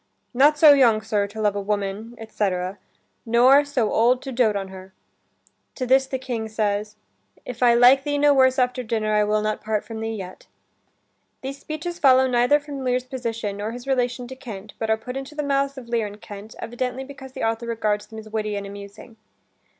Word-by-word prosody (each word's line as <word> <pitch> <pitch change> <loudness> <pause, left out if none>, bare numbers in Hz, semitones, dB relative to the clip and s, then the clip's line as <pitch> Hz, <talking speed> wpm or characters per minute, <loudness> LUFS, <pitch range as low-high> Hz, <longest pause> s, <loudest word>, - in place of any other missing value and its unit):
"Not 290 +4 +5
so 295 -1 +8
young, 230 -6 +4
Sir, 210 -2 0
to 210 +2 -10
love 210 -2 +1
a 200 - -2
woman, 205 +3 -3
etc., 195 -3 -3 0.4
nor 250 +5 +5
so 265 -7 -1
old 245 +3 +3
to 270 - -6
dote 235 -4 +2
on 195 -1 -3
her." 190 0 -12 0.8
To 255 - -3
this 265 +1 +3
the 265 - -3
King 240 -4 -4
says, 210 -1 -2 0.5
"If 250 -1 -8
I 240 -1 +5
like 250 +3 +6
thee 290 0 -1
no 290 0 +5
worse 260 -1 +4
after 250 0 +1
dinner, 220 -2 -1
I 210 0 +3
will 210 0 +1
not 215 0 -2
part 215 -1 -1
from 225 -1 -7
thee 225 0 -3
yet." 190 -3 -9 0.9
These 275 +1 -6
speeches 320 +4 -6
follow 260 -2 +6
neither 250 +3 +3
from 285 -2 -7
Lear's 250 0 0
position, 230 -5 -4
nor 210 +2 -4
his 245 +1 -8
relation 250 -2 -1
to 260 - -7
Kent, 215 -5 -9
but 225 - -2
are 220 - +3
put 250 +3 -8
into 270 +3 -6
the 300 - -2
mouths 275 0 0
of 250 -3 -9
Lear 230 -2 0
and 205 +1 -11
Kent, 210 0 -10
evidently 250 +2 -4
because 265 -1 -11
the - - -5
author 225 +1 -1
regards 210 -2 -1
them 220 - -11
as 220 0 -9
witty 215 -1 -2
and 200 0 -4
amusing. 200 +3 -11
235 Hz, 205 wpm, -23 LUFS, 215-260 Hz, 0.9 s, so